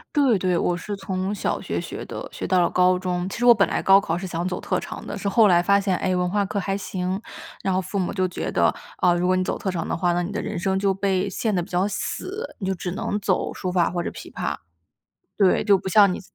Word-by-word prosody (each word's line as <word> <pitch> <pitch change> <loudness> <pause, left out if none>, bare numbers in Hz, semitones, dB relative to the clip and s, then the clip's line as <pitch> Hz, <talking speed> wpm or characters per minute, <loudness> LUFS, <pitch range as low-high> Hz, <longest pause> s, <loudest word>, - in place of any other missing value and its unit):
对 265 -8 +4
对， 180 -1 +1
我 175 +1 0
是 205 +3 -5
从 190 0 -3
小 - - -1
学 - - -3
学 - - -7
的， - - -6
学 - - -5
到 185 -1 +3
了 170 - +2
高 180 0 +3
中。 180 -1 -2
其 195 - -5
实 240 - 0
我 240 - +9
本 200 -3 +3
来 - - -2
高 195 0 +7
考 170 -4 -2
是 190 - -5
想 175 -1 -3
走 180 - -3
特 - - -1
长 - - -8
的， - - -5
是 205 - -4
后 210 +1 +5
来 175 -1 +5
发 200 +3 +4
现， 200 -1 0
诶， 185 - 0
文 180 0 0
化 205 0 +1
课 200 - -4
还 195 0 -1
行， 185 0 -3 0.4
然 190 - +1
后 185 - +1
父 190 +2 -3
母 180 - -1
就 185 -2 +1
觉 180 - -3
得， - - +2 0.3
啊， 180 - +4
如 175 +1 0
果 185 - +3
你 185 - +1
走 - - -2
特 195 - -3
长 175 -3 -2
的 - - -2
话， 175 0 +1
那 175 - +1
你 175 - -4
的 205 - -3
人 - - -4
生 190 +2 0
就 195 0 +2
被 195 0 0
限 215 +3 -1
得 180 - +1
比 170 - -8
较 180 +2 +1
死， 405 - -4
你 195 - -4
就 190 - 0
只 180 0 -4
能 205 +2 -2
走 195 -2 0
书 185 - -4
法 180 -2 +2
或 175 0 -2
者 - - -3
琵 - - -10
琶。 - - -3 0.8
对， 195 -3 +4
就 200 -2 +5
不 190 0 -5
像 200 -1 +6
你 - - -5
190 Hz, 300 characters per minute, -23 LUFS, 180-200 Hz, 0.8 s, 我